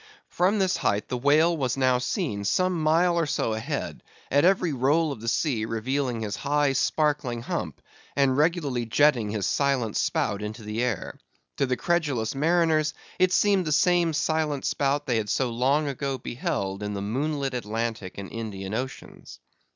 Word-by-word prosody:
From 185 +5 +2
this 190 -2 +1
height 100 +1 -1
the 125 - -2
whale 155 +6 +4
was 135 -4 -1
now 130 -2 +3
seen 125 - -2
some 180 - +1
mile 170 +3 +3
or 165 - 0
so 115 - 0
ahead, 110 0 -4 0.3
at 145 +1 +4
every 180 -3 +3
roll 145 +5 +2
of 115 - -7
the 115 - -7
sea 115 0 0
revealing 120 +2 -2
his 105 -2 -3
high 145 -1 +1
sparkling 140 -3 0
hump, - - -4 0.4
and 135 -2 +3
regularly 145 -6 0
jetting 125 -3 +3
his 105 -2 -2
silent 135 -6 0
spout 100 0 0
into 110 +2 -6
the 105 +2 -3
air. 120 -5 -2 0.4
To 140 - +1
the 125 -1 0
credulous 145 -10 0
mariners 155 +1 +2 0.2
it 185 0 +4
seemed 200 -2 +3
the 155 - -2
same 170 +2 +3
silent 155 -2 0
spout 140 +1 0
they 120 -4 +1
had 105 -2 -2
so 130 +2 0
long 135 +6 +1
ago 135 0 -2
beheld 100 -5 -3
in 105 0 -3
the 100 - -3
moonlit 135 +5 -2
Atlantic 115 -4 -3
and 100 -1 -7
Indian 105 -4 -5
Oceans. 130 +4 -6
135 Hz, 170 wpm, -26 LUFS, 115-155 Hz, 0.4 s, whale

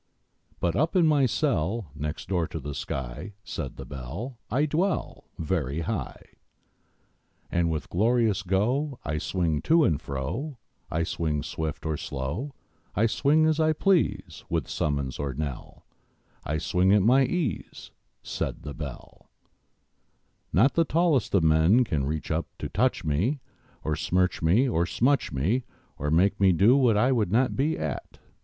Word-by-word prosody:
But 85 -1 0
up 155 +7 +1
in 180 -3 +5
my 145 -4 +4
cell 110 - -1
Next 75 +1 -5
door 90 -4 0
to 80 - -5
the 75 0 -6
sky, 65 - -5
Said 75 -8 -5
the - - -7
Bell, 70 - -7
I 135 +7 +2
dwell 170 +4 -1
Very 80 -3 -1
high; - - -4 1.3
And 85 -1 +1
with 80 -2 -3
glorious 110 +1 +2
go 120 +10 0
I 75 +1 -1
swing 85 -3 -1
to 165 0 +4
and 80 - +1
fro; 115 - -4 0.3
I 80 +1 0
swing 75 -3 -2
swift 80 -1 -4
or 80 -1 -1
slow, 70 - -4 0.4
I 110 - +3
swing 145 +7 +3
as 155 0 +2
I 155 0 +3
please, 105 - +1
With 80 -5 -1
summons 70 -4 -2
or 70 -3 -3
knell; 70 -3 -6 0.6
I 75 - -1
swing 90 +4 +2
at 105 -2 +4
my 130 +5 +5
ease, 135 - -3 0.3
Said - - -4
the 75 - -6
Bell: 70 -4 -9 1.2
Not 120 +10 +4
the 165 - +3
tallest 160 - +1
of 90 - +4
men 80 +10 +5
Can 75 - -1
reach 75 +2 -3
up 80 +2 -1
to - - -5
touch - - 0
me, 95 - 0 0.5
To 80 - 0
smirch 90 +3 0
me 95 +12 +4
or 85 -8 +1
smutch 135 +7 +1
me, 90 - 0 0.4
Or 75 - -1
make 95 +6 +3
me 95 -2 +5
do 100 +9 +5
what 125 -6 +4
I 125 +5 +3
would 110 -8 +1
not 125 +4 +2
be 150 +4 +1
at! 75 -4 -5
95 Hz, 160 wpm, -27 LUFS, 75-130 Hz, 1.3 s, in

